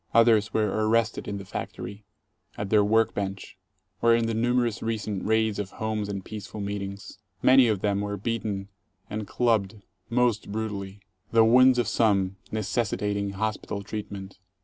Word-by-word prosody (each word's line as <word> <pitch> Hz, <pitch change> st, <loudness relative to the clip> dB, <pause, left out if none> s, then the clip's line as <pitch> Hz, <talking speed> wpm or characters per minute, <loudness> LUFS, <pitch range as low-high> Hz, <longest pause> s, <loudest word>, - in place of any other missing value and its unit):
Others 110 Hz, -3 st, +5 dB
were 110 Hz, -1 st, +2 dB, 0.2 s
arrested 115 Hz, 0 st, +1 dB
in 100 Hz, -, -3 dB
the 100 Hz, -, -8 dB
factory, 100 Hz, +2 st, -6 dB, 0.5 s
at 105 Hz, -1 st, -4 dB
their 105 Hz, -1 st, +5 dB
work 110 Hz, +2 st, +3 dB
bench, 100 Hz, -1 st, -4 dB, 0.5 s
or 115 Hz, 0 st, +5 dB
in 115 Hz, 0 st, +1 dB
the 115 Hz, -, -1 dB
numerous 120 Hz, 0 st, +1 dB
recent 110 Hz, -3 st, -2 dB
raids 110 Hz, -1 st, +1 dB
of 100 Hz, -2 st, -3 dB
homes 110 Hz, -2 st, -2 dB
and 100 Hz, -2 st, -5 dB
peaceful 105 Hz, 0 st, -7 dB
meetings. 100 Hz, 0 st, -5 dB, 0.2 s
Many 130 Hz, -1 st, +7 dB
of 105 Hz, -4 st, 0 dB
them 100 Hz, -1 st, +1 dB
were 100 Hz, 0 st, -3 dB
beaten 100 Hz, -2 st, -3 dB, 0.4 s
and 105 Hz, -1 st, -4 dB
clubbed 110 Hz, -4 st, +1 dB, 0.3 s
most 120 Hz, -4 st, +1 dB
brutally, 100 Hz, -2 st, -4 dB, 0.3 s
the 115 Hz, -1 st, +6 dB
wounds 125 Hz, +2 st, +6 dB
of 120 Hz, -3 st, +1 dB
some 100 Hz, -5 st, +2 dB
necessitating 105 Hz, -2 st, -1 dB
hospital 105 Hz, 0 st, -3 dB
treatment. 100 Hz, -2 st, -7 dB
105 Hz, 150 wpm, -26 LUFS, 100-115 Hz, 0.5 s, Many